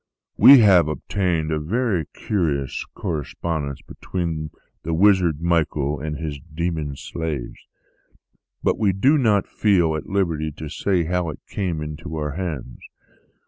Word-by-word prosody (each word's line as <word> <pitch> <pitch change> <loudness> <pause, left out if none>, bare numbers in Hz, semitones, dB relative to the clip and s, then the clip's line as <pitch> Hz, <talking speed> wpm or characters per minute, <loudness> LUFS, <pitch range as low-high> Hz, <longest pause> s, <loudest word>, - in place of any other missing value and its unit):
We 135 -3 +9
have 95 -7 +6
obtained 80 0 -1
a 80 - 0
very 95 - 0
curious 75 -8 -2
correspondence 80 -4 -3
between 80 -4 -4 0.3
the 80 0 -2
wizard 90 -4 +3
Michael 75 -4 0
and 75 +1 -4
his 75 -3 -5
demon 80 -1 -3
slaves; 75 -3 -5 1.0
but - - +1
we 100 -3 +2
do 135 +11 +3
not 105 -6 +3
feel 90 -7 +2
at 80 - -6
liberty 85 -6 0
to 75 +1 -7
say 90 +3 0
how 90 0 -1
it 75 - -7
came 85 -6 -3
into 75 +2 -7
our 75 -2 -2
hands. 75 -7 -5
80 Hz, 135 wpm, -22 LUFS, 75-95 Hz, 1.0 s, We